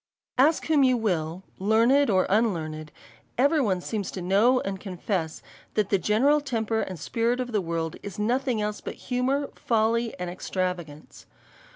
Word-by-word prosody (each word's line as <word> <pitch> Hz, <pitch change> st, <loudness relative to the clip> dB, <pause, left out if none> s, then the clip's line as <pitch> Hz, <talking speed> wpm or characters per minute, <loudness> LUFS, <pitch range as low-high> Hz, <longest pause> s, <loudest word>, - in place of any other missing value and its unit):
Ask 305 Hz, +4 st, +4 dB
who 310 Hz, -3 st, +3 dB
you 255 Hz, -2 st, +4 dB
will, 180 Hz, -5 st, -1 dB, 0.2 s
learned 230 Hz, +8 st, +4 dB
or 185 Hz, -3 st, +3 dB
unlearned, 160 Hz, -8 st, 0 dB, 0.5 s
every 285 Hz, +5 st, +3 dB
one 190 Hz, -7 st, 0 dB
seems 205 Hz, 0 st, -3 dB
to -, -, -5 dB
know 215 Hz, +8 st, +4 dB
and 195 Hz, -1 st, -4 dB
confess, 180 Hz, -3 st, -3 dB, 0.3 s
that 210 Hz, -2 st, +1 dB
the 195 Hz, -, +3 dB
general 270 Hz, +10 st, +3 dB
temper 225 Hz, -5 st, -1 dB
and 185 Hz, -, -5 dB
spirit 230 Hz, -, 0 dB
of 250 Hz, -1 st, -3 dB
the 210 Hz, -3 st, +1 dB
world, 165 Hz, -2 st, -3 dB
is 200 Hz, -3 st, -8 dB
nothing 245 Hz, +3 st, 0 dB
else 210 Hz, 0 st, -3 dB
but -, -, -6 dB
humour, 265 Hz, +3 st, -1 dB
folly, 230 Hz, 0 st, 0 dB
and 180 Hz, -, -4 dB
extravagance. 180 Hz, -4 st, -5 dB
215 Hz, 160 wpm, -26 LUFS, 185-250 Hz, 0.5 s, Ask